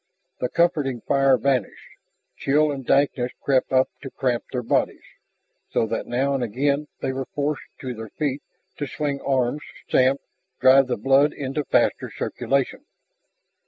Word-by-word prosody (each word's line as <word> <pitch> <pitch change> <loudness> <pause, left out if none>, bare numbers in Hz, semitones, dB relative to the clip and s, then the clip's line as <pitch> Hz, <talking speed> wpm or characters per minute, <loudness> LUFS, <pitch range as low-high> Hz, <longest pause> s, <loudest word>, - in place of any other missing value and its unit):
The 125 - -1
comforting 150 -8 +1
fire 135 -1 +3
vanished, 130 -5 -1 0.5
chill 150 +2 +2
and 135 -2 -5
dankness 135 -2 +1
crept 135 -2 +1
up 130 0 +4
to 135 - -6
cramp 125 -2 -1
their 125 -1 -2
bodies, - - 0 0.7
so - - +1
that 115 +1 -3
now 135 +3 0
and 135 -2 0
again 140 +6 0
they 130 - -1
were 130 0 -4
forced 145 0 -1 0.2
to 130 -2 -4
their 110 -1 -8
feet, 145 +1 -2 0.4
to 145 - -3
swing 145 -2 -3
arms, 135 +1 0 0.3
stamp, 130 +2 +3 0.4
drive 135 0 +6
the 125 - -1
blood 135 +6 +4
into 140 +2 -3
faster - - +1
circulation. 140 - -2
135 Hz, 150 wpm, -23 LUFS, 125-140 Hz, 0.7 s, drive